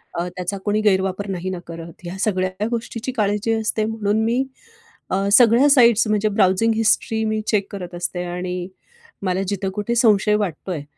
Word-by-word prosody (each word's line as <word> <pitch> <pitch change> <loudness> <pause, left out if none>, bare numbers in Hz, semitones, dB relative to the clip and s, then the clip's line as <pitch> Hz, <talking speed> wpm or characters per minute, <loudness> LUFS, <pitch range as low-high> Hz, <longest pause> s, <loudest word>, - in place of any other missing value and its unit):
अ, 170 +1 -2
त्याचा 180 +2 -3
कोणी 210 +1 +1
गैरवापर 190 -1 +1
नाही 185 0 -3
न 185 -2 -4
करत? 165 -1 -8
ह्या 175 +2 -6
सगळ्या 190 0 -1
गोष्टीची 235 +1 -4
काळजी 210 -1 0
असते. 215 0 0
म्हणून 220 0 0
मी 240 +4 +1 0.7
अ, 195 +1 0
सगळ्या 245 +5 +6
साइट्स 235 -5 +5
म्हणजे 215 0 +1
ब्राउजिंग 200 +3 +2
हिस्ट्री 220 0 +1
मी 215 0 -1
चेक 205 -3 +1
करत 180 -3 -7
असते 175 0 -3
आणि 180 0 -4 0.6
मला 185 0 0
जिथं 195 -1 -2
कुठे 210 +3 -2
संशय 210 -3 +4
वाटतो 190 -3 -3
आहे 150 -5 -4
205 Hz, 170 wpm, -21 LUFS, 185-220 Hz, 0.7 s, सगळ्या